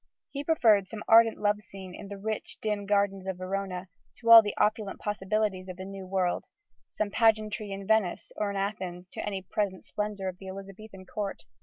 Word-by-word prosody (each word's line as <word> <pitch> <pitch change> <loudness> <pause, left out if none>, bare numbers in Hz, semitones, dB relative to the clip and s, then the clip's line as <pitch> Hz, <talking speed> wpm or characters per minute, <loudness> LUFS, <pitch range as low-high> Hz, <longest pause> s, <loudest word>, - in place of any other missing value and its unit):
He 280 0 -4
preferred 225 -11 +4
some 210 +1 -7
ardent 225 0 +7
love 210 0 +1
scene 190 -3 -10
in 200 - -9
the 200 0 -7
rich, 215 +2 -4
dim 210 -2 -2
gardens 200 -2 +1
of 190 -1 -2
Verona 185 0 -3 0.3
to 230 -1 +1
all 230 -1 +13
the 205 -2 -4
opulent 210 -2 +1
possibilities 205 -2 -1
of 180 - -7
the 185 - -6
New 195 -1 -8
World: 185 -2 0 0.4
some 210 -1 -2
pageantry 215 -2 +2
in 195 0 -5
Venice 215 -4 +1
or 210 - -1
in 200 - -3
Athens 185 -3 -3
to - - -6
any 195 -2 -3
present 190 0 -2
splendour 210 -2 -3
of 185 -1 -5
the 190 - -10
Elizabethan 195 +1 -9
court. 200 +1 -4
200 Hz, 190 wpm, -29 LUFS, 190-215 Hz, 0.4 s, all